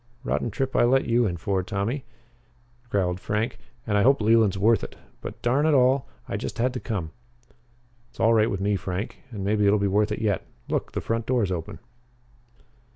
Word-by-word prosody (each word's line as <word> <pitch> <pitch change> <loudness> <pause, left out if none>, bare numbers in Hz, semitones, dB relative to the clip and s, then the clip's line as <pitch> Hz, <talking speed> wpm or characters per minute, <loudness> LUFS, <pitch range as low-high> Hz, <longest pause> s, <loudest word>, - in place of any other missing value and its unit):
"Rotten 120 - -1
trip 130 +5 -3
I - - +5
let 130 +3 +3
you 120 0 +2
in 85 -3 -3
for 95 +2 -1
Tommy," 110 +7 -3 0.8
growled 90 -3 0
Frank, 105 +5 -2 0.3
"and 105 -2 +1
I - - +4
hope 135 +5 +5
Leland's 110 -3 +3
worth 110 +4 +3
it. - - -7 0.3
But, - - -7
darn 135 +6 +2
it 155 - +4
all, 130 0 +3 0.2
I - - -2
just - - -5
had 125 +2 +1
to 125 - -3
come." 95 -11 -4 1.0
"It's 120 - -24
all 115 0 +4
right 110 0 +4
with 100 - -3
me, 100 +1 +1
Frank. 95 +1 -4
And 105 -5 -6
maybe 105 +1 +2
it'll 105 +1 +5
be 100 - 0
worth 105 +2 +2
it 105 - -1
yet. 105 -5 0 0.3
Look - - -2
the - - -2
front 115 0 -2
door's 120 -7 +1
open." 85 -3 -4
110 Hz, 200 wpm, -25 LUFS, 100-120 Hz, 1.0 s, I